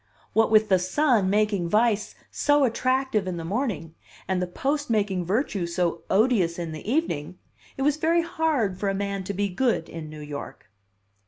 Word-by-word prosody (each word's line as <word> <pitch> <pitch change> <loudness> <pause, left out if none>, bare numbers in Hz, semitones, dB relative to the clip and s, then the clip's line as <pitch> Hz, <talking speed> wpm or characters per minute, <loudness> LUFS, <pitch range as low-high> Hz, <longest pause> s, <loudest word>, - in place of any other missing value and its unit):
" - - -33
what 225 0 +3
with 215 0 +5
The 190 -2 +4
Sun 215 +1 +2
making 205 -4 +1
vice 215 +1 +1 0.2
so 290 0 +3
attractive 255 -3 +1
in 180 -2 -3
the 165 - -5
morning 190 - -2 0.3
and 185 -1 0
the 180 - -1
Post 285 +10 -2
making 200 -5 0
virtue 200 -4 0
so 170 -1 -1
odious 195 -5 +2
in 170 -2 -4
the 155 +8 -5
evening, 185 - -1 0.4
it 270 - -1
was 295 +1 +2
very 330 +2 +2
hard 290 - 0
for 200 - 0
a 195 - -1
man 200 -1 -2
to 200 - -3
be 200 +1 0
good 195 -2 0
in 160 -2 -8
New 155 0 -9
York." 145 -7 -8
200 Hz, 185 wpm, -25 LUFS, 180-255 Hz, 0.4 s, with